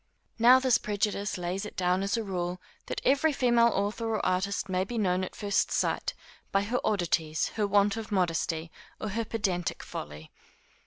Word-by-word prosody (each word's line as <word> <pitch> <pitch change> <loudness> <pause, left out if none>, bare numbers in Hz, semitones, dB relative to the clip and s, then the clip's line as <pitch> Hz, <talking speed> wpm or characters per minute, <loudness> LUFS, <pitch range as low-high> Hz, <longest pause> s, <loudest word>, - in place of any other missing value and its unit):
Now 245 +3 +8
this 260 -2 +3
prejudice 205 0 -1
lays 180 +3 -3
it 210 - -8
down 180 0 +2
as 200 +4 0
a 225 - -1
rule, 180 -2 -3 0.3
that - - -3
every 285 +4 +4
female 240 -4 +4
author 205 +3 -1
or - - -2
artist 190 +2 0
may 185 -1 0
be 235 +5 -5
known 185 -3 +1
at 185 - -6
first 205 -1 0
sight, - - 0 0.4
by 195 0 +2
her 240 +4 -1
oddities, 165 -6 0
her 210 -2 -1
want 200 +1 +3
of 220 -1 -6
modesty, 165 -3 0 0.3
or 215 - -3
her 225 +3 -1
pedantic 190 -6 -2
folly. 75 +1 -8
200 Hz, 175 wpm, -29 LUFS, 180-220 Hz, 0.4 s, Now